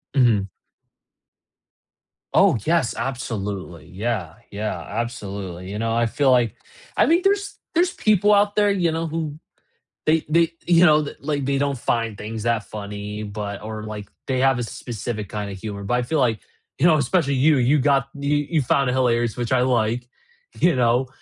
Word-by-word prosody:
Mhm. 115 -7 +3 1.8
Oh, 190 -9 +5
yes, 160 -8 +1
absolutely. 100 - -4
Yeah. 95 -4 -3 0.2
Yeah, 105 -3 -3
absolutely. 100 -3 -5
You 105 - -4
know, 115 0 0
I 120 0 +2
feel 135 +4 +1
like, 120 -3 +3 0.4
I - - +4
mean, 335 +2 +3
there's 400 0 +1 0.2
there's 355 +2 +3
people 210 -1 +3
out 205 0 +3
there, 205 -1 +4
you 180 -4 +1
know, 165 +1 -2
who 155 -2 -4 0.7
they 155 0 +2
they, 165 +1 +3
you 175 0 +5
know, 155 -2 +5
like, 145 -1 -2
they 140 0 +1
don't 140 -1 0
find 115 -3 -1
things 110 +1 -6
that 115 -2 +1
funny, 105 0 -6
but 100 -1 -5
or, 110 0 -6
like, 105 -1 -7 0.2
they 130 -1 0
have 135 -1 +3
a - - -1
specific 110 -3 -5
kinda 105 -1 -4
humor, 100 +1 -6
but 100 +5 0
I 125 - +1
feel 155 +6 -1
like, 115 -5 +2 0.4
you 145 - +3
know, 160 -2 +5
especially 140 +1 +1
you, 145 +3 +4
you 130 +4 +3
got 135 0 +2
you 140 +1 0
you 160 -3 +2
found 135 +1 +2
it - - 0
hilarious, 120 -3 +1
which 120 -2 -3
I 130 -1 +3
like, 120 -1 +1 0.5
you 175 -1 +4
know, 125 +1 +2
125 Hz, 175 wpm, -22 LUFS, 110-150 Hz, 1.8 s, Oh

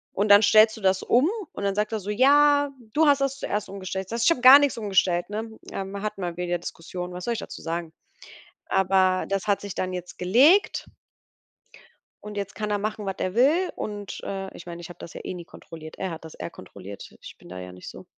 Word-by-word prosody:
Und 200 +2 0
dann 205 +1 +8
stellst 215 +1 +6
du 220 - -11
das 190 -1 +2
um 255 +8 +3 0.2
und - - -6
dann 200 -1 0
sagt 210 +1 -1
er 220 - -2
so: 200 +1 -8
„Ja, 285 +5 +4 0.2
du 315 +1 +4
hast 280 -1 +4
das 275 0 0
zuerst 210 -6 -3
umgestellt.“ 190 -1 -5
Ich - - -21
sage 230 +1 -3
so: - - +2
„Ich - - +6
habe 290 - 0
gar 260 +2 +11
nichts 285 -3 +1
umgestellt,“ 190 -4 +1
ne? 220 +2 -5 0.2
Ähm, 195 +1 -5
hatten 210 -2 -4
wir 175 -1 -3
wieder 175 0 -2
Diskussionen. 180 +1 -7
Was 180 0 -6
soll 235 - 0
ich 230 - -4
dazu - - -8
sagen? 165 0 -4 0.8
Aber 190 -1 +2
das 195 0 -2
hat 205 -1 +1
sich 200 -2 -6
dann 185 0 -3
jetzt 180 0 -7
gelegt 265 - +4 1.4
und 210 0 -8
jetzt 200 -1 -4
kann 210 +1 -3
er 205 - +1
machen, 210 0 -4
was 195 -1 -3
er 185 +1 -2
will 310 +10 +3
und 205 -2 -6
äh, 195 -1 -5
ich 175 - -11
meine, 170 0 -8
ich 170 - -10
habe 175 - -11
das 170 - -10
ja - - -8
eh - - -5
nie 175 -1 -8
kontrolliert. 160 -1 -12
Er 190 -2 -3
hat 160 0 -8
das 160 - -10
eher - - -6
kontrolliert. 100 - -11
Ich - - -11
bin - - -16
da 90 +1 -8
ja 90 0 -8
nicht 90 0 -10
so. - - -11
195 Hz, 240 wpm, -25 LUFS, 180-220 Hz, 1.4 s, gar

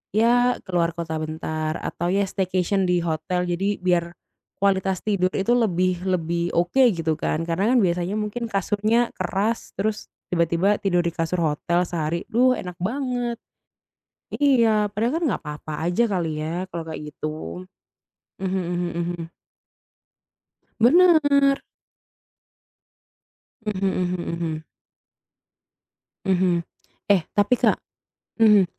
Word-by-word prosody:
ya 245 +3 +4
keluar 170 -2 +1
kota 165 -1 -4
bentar.” 155 0 -3
Atau 175 +1 -2
ya 200 - +3
staycation 190 +1 0
di 180 0 +2
hotel. 170 +2 -1
Jadi 195 +4 -1
biar 175 -2 +1 0.5
kualitas 190 -1 +1
tidur 195 -4 +2
itu 195 +5 +2
lebih 185 -6 +1
lebih 170 -2 0
oke 175 +10 +2
gitu 165 -3 -1
kan. 155 +1 -1
Karena 185 +6 +1
kan - - +5
biasanya 180 -1 0
mungkin 225 +2 -3
kasurnya 210 +4 +1
keras, 195 +5 -1
terus 210 +1 -2 0.2
tiba-tiba 170 +4 +2
tidur 180 -3 +2
di 170 - -1
kasur 165 +2 -1
hotel 170 +4 +1
sehari. 170 0 -2
Duh, 250 +3 +4
enak 180 -1 -6
banget. 245 +1 -2 1.0
Iya. 230 -7 +3
Padahal 225 +5 0
kan - - -1
nggak 190 - -3
papa 150 +1 -6
aja 180 +7 +2
kali 165 -5 -1
ya 165 +4 -2
kalau 170 - -3
kayak 150 -2 -7
gitu. 90 - -6 0.8
Mhm 190 -1 -1 0.2
mhm 175 0 -1
mhm. 170 -1 -3 1.6
Bener. 285 -1 +5 2.0
Mhm 195 -2 -1
mhm 180 -1 -1
mhm. 165 -2 -3 1.6
Mhm. 180 -2 +2 0.5
Eh 200 -4 +4
tapi, 205 +4 +3
Kak - - +2 0.6
mhm, 210 -3 +7
185 Hz, 120 wpm, -23 LUFS, 170-210 Hz, 2.0 s, mhm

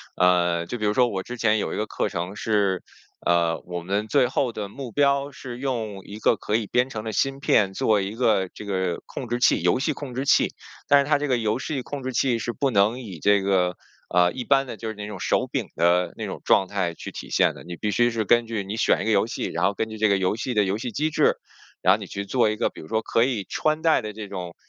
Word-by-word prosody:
呃， 85 -2 +3
就 120 - -5
比 105 - -2
如 105 - +2
说 125 +1 +4
我 95 -2 -3
之 125 0 -7
前 110 -1 +2
有 - - -2
一 - - -3
个 110 - -1
课 - - -2
程 90 +2 -4
是 100 -5 +1 0.4
呃， 85 -1 +2
我 90 -1 -5
们 100 +5 -2
最 130 -2 +3
后 125 -2 -1
的 105 -2 -5
目 130 0 -8
标， 140 0 +2
是 125 -2 -8
用 110 -7 -3
一 105 +1 -9
个 115 - +3
可 105 - -2
以 110 -3 0
编 125 +2 +1
程 110 -4 -5
的 110 - -4
芯 135 +4 0
片 100 -7 +3
做 105 +1 +2
一 100 +3 -3
个 110 -6 +2
这 - - -9
个 95 -3 -2
控 125 - -6
制 120 +1 -2
器 - - +4
游 - - +3
戏 135 - 0
控 130 -4 -7
制 130 - -1
器。 - - +3 0.3
但 145 - +6
是 140 - +2
它 145 - +4
这 145 0 -2
个 125 -2 +2
游 110 +1 0
戏 140 -3 -3
控 140 +2 -6
制 130 0 -4
器 120 -3 +1
是 120 - -3
不 135 -2 0
能 105 +4 +3
以 95 -9 -8
这 100 +2 +3
个， 90 -2 +1 0.3
呃， 90 0 +4
一 125 - -6
般 135 -1 +3
的 115 - -7
就 110 - -6
是 110 - -3
那 105 0 -6
种 105 - -7
手 - - +1
柄 - - -2
的 90 +1 +2
那 - - -5
种 - - -6
状 95 - +4
态 95 -4 -1
去 - - -8
体 - - -8
现 - - +3
的， 65 - -12
你 85 0 -6
必 105 +2 -2
须 120 +4 +3
是 115 -2 -1
根 120 +2 +3
据 110 -3 -3
你 105 +3 -5
选 - - +2
一 - - -3
个 110 - +1
游 105 +2 +3
戏， - - -4
然 85 +2 -1
后 100 - +2
根 110 +2 -3
据 110 - -7
这 110 0 +3
个 100 -1 +3
游 95 +3 0
戏 125 +2 -3
的 105 -1 +3
游 95 +2 -1
戏 120 +1 -4
机 155 +7 0
制， - - +3 0.5
然 - - +6
后 - - 0
你 - - -7
去 100 0 -5
做 115 +1 +2
一 110 - -1
个 - - 0
比 - - -11
如 80 - -11
说 110 +4 0
可 115 - +2
以 120 -6 -1
穿 155 0 0
戴 160 -5 +4
的 105 -1 -6
这 105 -1 -7
种， 90 -3 -6
110 Hz, 300 characters per minute, -24 LUFS, 95-125 Hz, 0.5 s, 但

